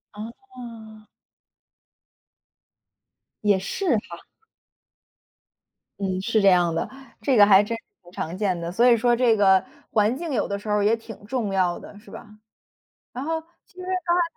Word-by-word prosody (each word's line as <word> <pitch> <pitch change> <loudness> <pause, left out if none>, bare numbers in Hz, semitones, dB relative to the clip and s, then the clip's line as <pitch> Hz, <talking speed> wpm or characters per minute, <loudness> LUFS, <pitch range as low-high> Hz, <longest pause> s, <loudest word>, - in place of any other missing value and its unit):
哦。 225 - -11 2.4
也 205 -2 +3
是 265 - 0
哈。 170 -5 -9 1.8
嗯， 190 -2 -2
是 220 +1 +1
这 200 - +4
样 175 -2 +3
的， 165 - -2 0.3
这 255 +2 +2
个 205 - +9
还 200 -1 +6
真 230 +2 -4
是 - - -17 0.2
挺 175 - -17
常 170 0 -5
见 190 -4 0
的， 170 0 -4
所 235 +7 +3
以 240 -1 +6
说 240 +1 +3
这 235 -2 +3
个 190 -2 +5 0.3
环 215 +3 +2
境 330 0 -5
有 220 - 0
的 200 - -3
时 205 - -11
候 210 - +1
儿 205 - +1
也 220 +2 +4
挺 225 -2 -12
重 220 -3 -2
要 180 -2 +1
的， 205 - -12
是 215 - -18
吧？ - - -10 0.9
然 255 +2 -5
后， 320 +1 -1 0.3
其 - - -29
实 365 - -11
刚 365 -1 0
才 355 - +3
215 Hz, 180 characters per minute, -24 LUFS, 195-245 Hz, 2.4 s, 个